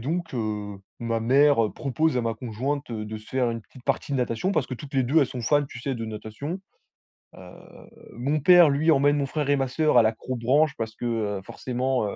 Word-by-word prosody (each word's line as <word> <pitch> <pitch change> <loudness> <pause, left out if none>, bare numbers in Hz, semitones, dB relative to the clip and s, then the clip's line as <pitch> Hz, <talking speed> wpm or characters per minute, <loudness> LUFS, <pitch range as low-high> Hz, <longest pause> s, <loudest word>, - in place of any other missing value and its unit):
donc, 165 +5 -3
heu, 105 -3 -3 0.2
ma 115 -1 -2
mère, 135 +1 +4
heu, 105 - -3
propose 145 0 0
à - - +2
ma 115 -1 -1
conjointe, 130 +5 -4
heu, 110 -2 -4
de 110 +1 -6
se 110 0 -13
faire 130 -2 0
une 115 -1 -5
petite 125 +3 -17
partie 140 +1 -1
de - - +1
natation 125 - -1
parce 145 -9 0
que 130 - -5
toutes 140 +3 -10
les 130 -1 +2
2, 145 +7 +3
elles 140 - +3
sont 125 -1 -6
fans, 145 +5 +2
tu 125 -3 -10
sais, 135 +1 -2
de 115 -2 -5
natation. 110 - -6 0.8
Heu, - - -14 0.7
mon 140 +6 -1
père, 175 +2 +7
lui, 150 +4 +2
emmène 145 0 +4
mon 140 - 0
frère 145 +1 -3
et 145 - +4
ma 135 -1 0
sœur 150 +1 +2
à 120 - +7
l'accrobranche 130 +6 +1
parce 110 -1 -4
que, 120 - -6
heu, 105 -4 -1
forcément, 125 +2 -2
heu - - -5
130 Hz, 230 wpm, -25 LUFS, 115-145 Hz, 0.8 s, père